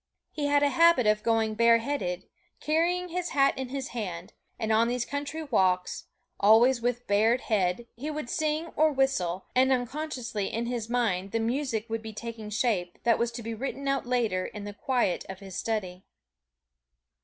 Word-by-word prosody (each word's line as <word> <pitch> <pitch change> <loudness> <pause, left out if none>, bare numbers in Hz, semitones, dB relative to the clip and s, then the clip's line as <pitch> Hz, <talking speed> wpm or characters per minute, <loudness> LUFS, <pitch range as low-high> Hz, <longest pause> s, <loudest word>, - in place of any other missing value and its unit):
He 295 -2 -2
had 285 0 +3
a 285 - +4
habit 335 -2 +5
of 210 0 +3
going 225 -1 +1
bareheaded, 230 -4 +2 0.4
carrying 345 +4 +1
his 355 +1 -3
hat 275 0 +4
in 265 -2 -5
his 270 0 -4
hand; 190 -5 -5 0.2
and 220 0 -2
on 225 +1 +4
these 240 0 -1
country 290 +3 -4
walks, 185 -9 +1 0.3
always 230 +4 +5
with 245 0 -1
bared 220 +5 +3
head, 200 0 0
he 280 +6 -5
would 305 -4 -4
sing 310 +5 -1
or 310 0 +4
whistle, 230 -10 0
and 260 +1 +4
unconsciously 245 -5 -2
in 230 +1 -2
his 235 -2 -3
mind 205 -6 0
the 230 - +1
music 230 -1 -1
would 225 0 -3
be 220 0 -8
taking 225 -1 -7
shape 205 -6 -1
that 235 -1 +3
was 235 0 0
to 235 0 -6
be 230 +1 -4
written 275 +4 -4
out 275 -2 0
later 225 -7 0
in 210 - -8
the 205 0 -6
quiet 240 -3 0
of 190 - -6
his 190 -1 -10
study. 190 -4 -3
235 Hz, 180 wpm, -28 LUFS, 210-275 Hz, 0.4 s, habit